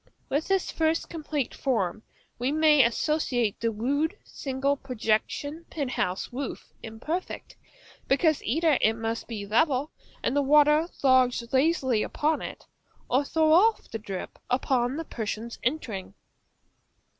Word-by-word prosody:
With 290 +3 0
this 385 -1 +1
first 320 0 0
complete 300 -5 -3
form 215 -7 -1 0.4
we 250 +3 0
may 305 -2 +5
associate 245 -3 0
the 230 - +1
rude, 285 - -1
single, 275 +1 -2
projecting, 275 +5 -2
penthouse 250 - -3
roof; 265 0 -6
imperfect, 280 +12 -5 0.5
because 305 +2 +3
either 315 +3 +2
it 220 - +4
must 225 0 -4
be 215 -4 -5
level 270 +6 +1 0.3
and - - 0
the 285 - +4
water 300 +3 +5 0.2
lodge 255 -2 +4
lazily 260 -5 +2
upon 305 +6 0
it, - - -7 0.5
or 260 +3 +3
throw 315 +2 +2
off 430 +6 +3
the 225 - -4
drip 195 -3 -7
upon 250 +1 +1
the 325 - -4
persons 225 -1 -5
entering. 225 -8 -3
270 Hz, 130 wpm, -27 LUFS, 230-310 Hz, 0.5 s, may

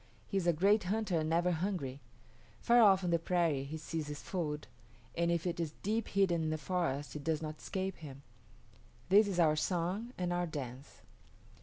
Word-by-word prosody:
He 195 - -2
is 180 -2 0
a - - +6
great 195 +5 +3
hunter 205 -3 0
and 155 0 -1
never 175 +2 +2
hungry. 160 -6 -2 0.6
Far 240 0 +5
off 195 -3 +6
on 175 - 0
the 170 - +3
prairie 165 -5 +1
he 155 +3 -5
sees 155 0 -4
his 150 -1 -6
food, 150 -5 -3 0.5
or 170 - +1
if 170 0 0
it 170 -1 -2
is 160 -3 -3
deep 220 +3 0
hidden 190 -4 +2
in 160 - -1
the 155 - -1
forest 155 -5 -2
it 150 - -6
does 160 0 -1
not 155 0 -5
escape 190 0 -3
him. 140 -3 -10 0.9
This 205 +2 +6
is 190 -3 -2
our 155 -3 +5
song 180 +8 -1
and 180 -1 -1
our 175 0 0
dance." 135 -3 -7
170 Hz, 195 wpm, -33 LUFS, 155-190 Hz, 0.9 s, a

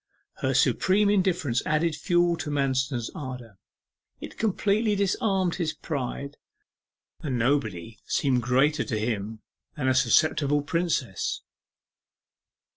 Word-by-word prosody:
Her - - -1
supreme 200 +2 +3
indifference 180 - +1
added 155 +1 +1
fuel 175 +2 +2
to 150 - -5
Manston's 130 -4 -1
ardour 125 - -8 0.6
it - - -9
completely 210 0 +1
disarmed 195 -2 +1
his 165 -4 -1
pride. 140 -1 -5 0.8
The 160 - -7
invulnerable 125 -1 +1
Nobody 105 +1 -8
seemed 130 -3 +1
greater 135 +6 +2
to 115 - -3
him 110 -1 -3 0.4
than 130 -3 -1
a 130 - +4
susceptible 145 +3 +3
Princess. 155 - -1
145 Hz, 115 wpm, -26 LUFS, 125-175 Hz, 0.8 s, a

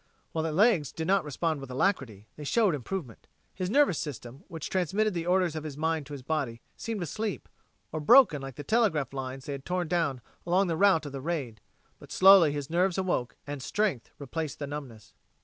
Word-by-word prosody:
While 160 - -1
the 160 - -1
legs 180 - +3
did 160 - -4
not 195 +1 +3
respond 155 +1 -2
with 135 - -8
alacrity, 125 - -1
they 150 - -9
showed 205 +5 +2
improvement. 150 - -6 0.3
His 185 -1 -3
nervous 275 - +3
system, 135 0 -7
which 165 -4 -6
transmitted 195 +4 +1
the 170 -1 -3
orders 180 -3 +2
of 155 - -4
his 150 -3 -7
mind 160 -2 -1
to 145 - -9
his 135 -3 -7
body, 135 -5 -2 0.2
seemed 220 -5 -4
asleep 210 +6 -4 0.4
or 155 - -3
broken 185 - +6
like 135 -2 -7
the 145 - -7
telegraph 160 - +1
lines 135 0 -5
they 145 - -5
had 140 -1 -5
torn 180 +1 -2
down 160 -7 0 0.2
along 180 +3 +2
the 170 -3 -1
route 185 -3 +4
of 145 - -6
the 135 -1 -6
raid. 135 -9 -4 0.4
But - - -14
slowly 190 -5 +7
his 145 -2 -4
nerves 180 +3 +1
awoke, 175 -11 -1
and 145 -1 -6
strength 185 - -1
replaced 150 +2 -4
the 145 - -4
numbness. 135 -7 -8
160 Hz, 200 wpm, -28 LUFS, 140-185 Hz, 0.4 s, slowly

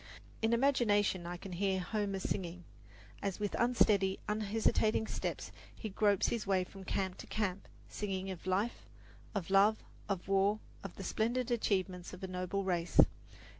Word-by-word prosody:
In 225 0 +2
imagination 210 -8 +3
I 175 0 -4
can 190 +2 -9
hear 190 +1 0
Homer 200 +1 -1
singing, 180 -2 -3 0.6
as 195 0 -2
with 205 -1 -1
unsteady, 210 -5 +3
hesitating 215 +1 +1
steps - - -4 0.2
he 220 - -5
gropes 205 0 +3
his 230 -4 -2
way 190 -2 +3
from 190 +1 -11
camp 190 0 -2
to - - -8
camp 200 -3 -2 0.2
singing 195 -2 -3
of 185 0 -8
life, 200 +6 0 0.5
of 195 -2 -2
love, 205 +3 +5 0.3
of 190 -3 -2
war, 195 +2 +3 0.2
of 195 - -7
the 195 - -7
splendid 240 +5 0
achievements 185 -6 0
of 185 +1 -9
a - - -2
noble 185 +2 -2
race. 175 -2 0
195 Hz, 155 wpm, -34 LUFS, 185-215 Hz, 0.6 s, love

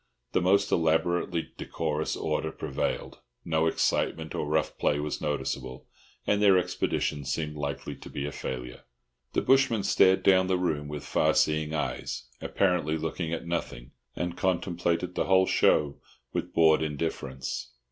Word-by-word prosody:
The - - +2
most 100 +3 +3
elaborately 85 +1 +1
decorous 80 -1 -2
order - - -2
prevailed; 70 -4 -3 0.3
no 80 0 +2
excitement 80 0 0
or 75 - -2
rough 75 -1 0
play 75 - +2
was 75 0 -3
noticeable, 65 -3 -3 0.4
and 105 0 +2
their 100 -2 +6
expedition 75 -4 -1
seemed 75 +3 -3
likely 70 -1 -4
to - - -11
be 70 - -4
a 75 - -3
failure. 60 -3 -6 0.5
The - - +1
bushman 135 -6 +3
stared 95 0 +4
down 95 -1 +5
the 95 -1 +2
room 75 -5 -1
with 75 -1 -6
far - - +2
seeing 75 0 +2
eyes, 75 - -3 0.2
apparently 90 -5 +1
looking 80 +1 -3
at 85 - -3
nothing, 65 -7 -4 0.2
and 90 -1 -3
contemplated 90 -1 0
the - - 0
whole 95 -1 +5
show 75 -5 +2 0.3
with - - -3
bored 80 -1 +5
indifference. 70 -4 -3
80 Hz, 145 wpm, -28 LUFS, 75-90 Hz, 0.5 s, their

